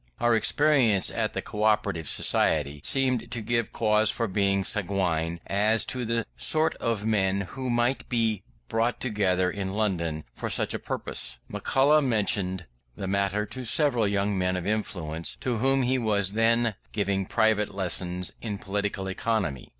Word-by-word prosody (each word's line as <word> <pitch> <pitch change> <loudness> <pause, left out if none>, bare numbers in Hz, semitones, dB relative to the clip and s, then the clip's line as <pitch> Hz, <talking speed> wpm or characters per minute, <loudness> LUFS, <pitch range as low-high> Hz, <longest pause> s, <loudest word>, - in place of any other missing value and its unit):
Our 120 0 +3
experience 125 -5 +3
at - - -2
the - - -3
Co 105 - -6
operative 105 -7 +1
Society 75 -1 +1
seemed 130 -4 0
to 120 -1 -4
give 115 0 -1
cause 110 -1 +2
for 115 - -1
being 100 0 +1
sanguine 90 -5 0
as 105 +3 +2
to 125 -2 -3
the 115 0 -1
sort 155 - +4
of 115 -3 -2
men 100 -3 +1
who 130 +7 -5
might 120 +2 0
be 115 -5 0 0.3
brought 115 +1 0
together 95 -6 0
in 95 -1 -4
London 85 -7 -1
for - - -5
such - - 0
a - - -3
purpose. - - -5
McCulloch 145 +3 +3
mentioned 100 -6 0 0.3
the 95 - -5
matter 100 +2 0
to 130 +5 -7
several 125 -2 +2
young 100 0 0
men 90 0 0
of 90 -1 -4
influence, 90 -6 -3
to 125 -3 -1
whom 135 +3 +2
he 130 +1 +1
was 100 -4 +2
then 115 +1 +2 0.2
giving 100 -2 -1
private 110 -1 +1
lessons 90 -1 0
in 105 -3 -4
political 100 0 -3
economy. 95 - -2
105 Hz, 160 wpm, -26 LUFS, 95-115 Hz, 0.3 s, sort